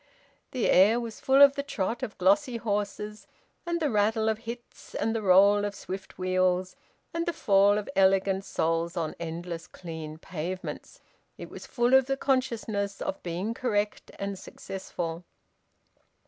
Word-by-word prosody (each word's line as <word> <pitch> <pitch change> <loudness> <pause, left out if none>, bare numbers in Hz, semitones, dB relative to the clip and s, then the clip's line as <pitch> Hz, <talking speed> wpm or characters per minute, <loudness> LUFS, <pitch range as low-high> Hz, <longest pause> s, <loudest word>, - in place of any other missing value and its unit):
The 250 -3 -1
air 210 +6 +5
was 230 -2 -6
full 270 +1 +6
of 280 -1 +8
the 280 - -2
trot 235 -4 -3
of 210 - -5
glossy 230 +7 +3
horses 210 -1 -3 0.4
and 340 0 0
the 300 -4 0
rattle 220 +1 +2
of 220 +2 -3
bits 235 +1 -9
and 225 - 0
the 225 - -1
roll 200 +1 +5
of 205 0 -3
swift 190 0 -7
wheels, 185 0 +1 0.4
and 335 +1 -2
the - - +2
fall 200 -3 +4
of 210 - -3
elegant 195 0 +3
soles 165 0 -1
on 160 -2 -1
endless 170 0 -5
clean 160 -3 -8
pavements; 180 +3 -6 0.4
it - - -9
was - - -9
full 240 0 +1
of 265 -1 +6
the 270 0 0
consciousness 230 -7 -1
of 195 - -4
being 180 +6 -3
correct 210 -4 -1
and 200 -1 -4
successful. 175 -3 -6
200 Hz, 155 wpm, -28 LUFS, 185-230 Hz, 0.4 s, of